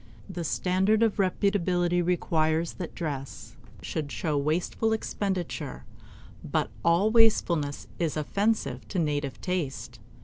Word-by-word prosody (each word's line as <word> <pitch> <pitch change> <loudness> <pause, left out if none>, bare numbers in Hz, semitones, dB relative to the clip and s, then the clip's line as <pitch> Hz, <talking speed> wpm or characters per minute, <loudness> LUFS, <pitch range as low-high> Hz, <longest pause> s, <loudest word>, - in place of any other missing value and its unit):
The 180 -3 -5
standard 190 +7 +2
of 225 -3 +2
reputability 180 -3 +2
requires 165 -2 +1
that 175 -3 -7
dress 140 -6 -5 0.3
should 150 -3 -3
show 155 -3 -1
wasteful 165 +9 +1
expenditure; 180 - -3 0.6
but - - -1
all 175 +6 +4
wastefulness 175 -10 +3
is 165 -3 0
offensive 205 +8 0
to 195 - -4
native 145 -4 -1
taste. 145 -10 -3
175 Hz, 110 wpm, -28 LUFS, 155-195 Hz, 0.6 s, all